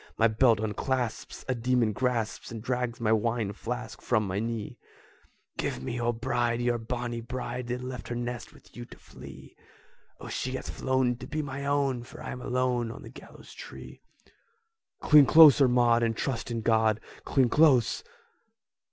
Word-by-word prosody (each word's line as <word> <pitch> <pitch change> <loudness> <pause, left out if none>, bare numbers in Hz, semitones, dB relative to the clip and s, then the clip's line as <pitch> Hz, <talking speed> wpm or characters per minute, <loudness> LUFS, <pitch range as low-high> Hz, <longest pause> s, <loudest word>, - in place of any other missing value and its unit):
My 115 - +5
belt 115 0 +3
unclasps, 115 +3 -3
a 130 - +1
demon 120 -2 +1
grasps 120 -1 -2
And 115 - -6
drags 125 -1 -2
my 110 -2 +1
wine 110 -1 0
flask 115 0 -6
from 110 -4 +1
my 95 +1 -2
knee!" 115 -1 -4 0.8
"Give 65 - -3
me - - -4
your 120 0 0
bride, 120 0 -1
your 120 -1 0
bonnie 120 0 -4
bride, 125 0 -5
That 125 +1 -3
left 125 -3 -6
her 120 - -4
nest 120 0 -5
with - - -20
you 120 - -7
to - - -14
flee! - - -13 0.6
O, - - -9
she 130 - -3
hath 130 - -5
flown 130 -2 0
to 125 - -9
be 155 +2 -3
my 140 0 -5
own, 140 -3 +1
For 120 - -11
I'm 125 - -6
alone 125 -2 0
on - - -10
the - - -10
gallows - - -14
tree!" - - -11 1.0
"Cling 150 -3 +7
closer, 150 -4 +8
Maud, 120 -1 +3
and 115 -1 0
trust 120 -3 -3
in 115 -1 -3
God! 110 -1 +2 0.2
Cling 130 -3 +2
close! 140 -5 +4
120 Hz, 170 wpm, -28 LUFS, 115-125 Hz, 1.0 s, closer